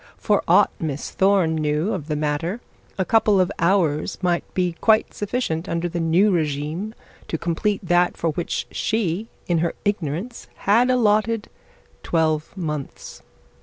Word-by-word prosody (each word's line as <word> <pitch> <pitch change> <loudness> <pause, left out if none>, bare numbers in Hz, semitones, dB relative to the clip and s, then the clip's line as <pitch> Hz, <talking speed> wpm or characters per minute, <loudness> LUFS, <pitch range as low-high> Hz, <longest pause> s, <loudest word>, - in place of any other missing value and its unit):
For - - +1
aught - - +5
Miss 150 -3 -4
Thorne 190 -4 +3
knew 155 +6 0
of 160 -7 -5
the 155 - -1
matter, 150 +7 -1 0.4
a 190 - 0
couple 215 -2 +3
of 185 +1 +2
hours 170 -4 +1
might 175 -1 0
be 180 -1 +1
quite 220 -1 +3
sufficient 200 -6 -2
under 170 +1 -1
the 170 0 -4
new 170 +6 +3
regime 160 +5 -2 0.3
to 160 - -2
complete 175 +5 -1
that 175 +1 +3
for 165 - 0
which 170 +3 -3
she 215 -2 -1 0.2
in 170 -2 +1
her 170 +1 -1
ignorance 205 - -3 0.2
had 230 +6 +4
allotted 225 -2 +2 0.5
twelve 160 +1 0
months. 150 -6 -5
175 Hz, 145 wpm, -22 LUFS, 160-205 Hz, 0.5 s, aught